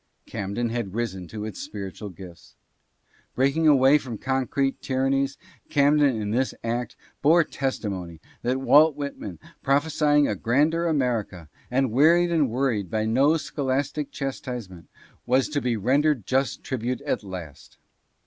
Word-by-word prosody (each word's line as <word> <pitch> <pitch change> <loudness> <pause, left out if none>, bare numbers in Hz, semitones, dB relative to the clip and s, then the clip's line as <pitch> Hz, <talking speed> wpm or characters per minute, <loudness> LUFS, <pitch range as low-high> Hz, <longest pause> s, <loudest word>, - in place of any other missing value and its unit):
Camden 110 +3 -3
had 115 -4 -4
risen 95 -7 -3
to 105 +2 -6
its 110 - -7
spiritual 100 0 -7
gifts. 90 -2 -13 0.8
Breaking 140 +5 +2
away 140 0 +6
from 125 -5 -7
concrete 135 +2 -1
tyran 130 0 0
nies, 135 0 0 0.3
Camden 145 -3 +3
in 105 -1 -3
this 130 +3 0
act 120 +1 -3 0.3
bore 165 +4 +5
testimony 100 - -4 0.2
that 125 +2 0
Walt 150 +3 +5
Whitman, 140 - -6 0.2
prophesying 145 +1 +2
a - - 0
grander 150 - +1
America, 115 - -1 0.2
and 130 -1 +1
wearied 170 +7 +4
and 155 -6 +2
worried 115 -6 -1
by 110 +3 -1
no 135 +8 +3
scholastic 140 0 -2
chastisement, 125 -9 -6 0.4
was 130 +2 +3
to 145 -1 -1
be 120 -2 0
rendered 135 +2 +1
just 135 +1 0
tribute 125 -1 -3
at - - -2
last. 90 -7 -9
130 Hz, 140 wpm, -25 LUFS, 110-140 Hz, 0.8 s, away